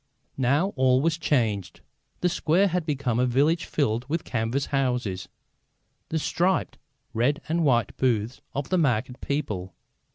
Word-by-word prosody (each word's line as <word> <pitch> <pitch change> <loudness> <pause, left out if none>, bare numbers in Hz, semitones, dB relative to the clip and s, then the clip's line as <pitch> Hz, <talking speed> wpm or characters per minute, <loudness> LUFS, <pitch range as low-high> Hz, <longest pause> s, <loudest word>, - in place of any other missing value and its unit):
Now 140 +9 +2
all 130 0 +4
was 160 +3 +1
changed. 115 - 0 0.4
The 180 - +3
square 175 +3 +2
had 175 -2 -1
become 130 -5 0
a 125 - +3
village 145 +7 +2
filled 120 -3 -1
with 165 +2 -1
canvas 115 +4 -1
houses, 125 -8 -1 0.8
the 160 - -1
striped 175 +4 0 0.3
red 125 +7 +1
and 165 +1 +1
white 120 -7 +2
booths 120 -2 0
of 140 0 -3
the 185 - +2
market 125 -4 0
people. 105 -11 -3
135 Hz, 140 wpm, -26 LUFS, 120-155 Hz, 0.8 s, all